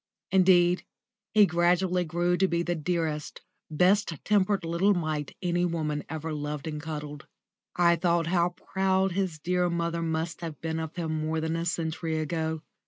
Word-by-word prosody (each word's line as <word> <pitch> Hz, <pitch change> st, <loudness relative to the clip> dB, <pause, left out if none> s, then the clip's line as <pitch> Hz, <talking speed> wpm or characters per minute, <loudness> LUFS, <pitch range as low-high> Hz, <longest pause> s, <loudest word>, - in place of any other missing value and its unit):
Indeed, 180 Hz, -1 st, +4 dB, 0.5 s
he 210 Hz, -1 st, +6 dB
gradually 180 Hz, +1 st, +2 dB
grew 175 Hz, +2 st, 0 dB
to 190 Hz, -, +3 dB
be 170 Hz, -1 st, 0 dB
the 175 Hz, -, -1 dB
dearest, 160 Hz, -2 st, -2 dB, 0.3 s
best 180 Hz, +5 st, +3 dB
tempered 200 Hz, -3 st, +2 dB
little 175 Hz, +5 st, +2 dB
mite 155 Hz, -4 st, -3 dB
any 175 Hz, 0 st, +1 dB
woman 155 Hz, -4 st, -1 dB
ever 160 Hz, +1 st, -4 dB
loved 150 Hz, -1 st, -4 dB
and 150 Hz, -2 st, -4 dB
cuddled. 150 Hz, -2 st, -6 dB, 0.5 s
I 170 Hz, -1 st, +4 dB
thought 170 Hz, 0 st, +2 dB
how 175 Hz, +1 st, +2 dB, 0.2 s
proud 190 Hz, 0 st, +2 dB
his 185 Hz, -3 st, -1 dB
dear 180 Hz, +3 st, 0 dB
mother 170 Hz, 0 st, -1 dB
must 165 Hz, +1 st, -2 dB
have 165 Hz, -3 st, -6 dB
been 160 Hz, 0 st, -3 dB
of 160 Hz, -1 st, -5 dB
him 160 Hz, -3 st, -2 dB
more 155 Hz, +1 st, -1 dB
than 160 Hz, +1 st, -1 dB
a 165 Hz, 0 st, -2 dB
century 165 Hz, -1 st, -2 dB
ago. 160 Hz, 0 st, -2 dB
170 Hz, 165 wpm, -28 LUFS, 160-180 Hz, 0.5 s, he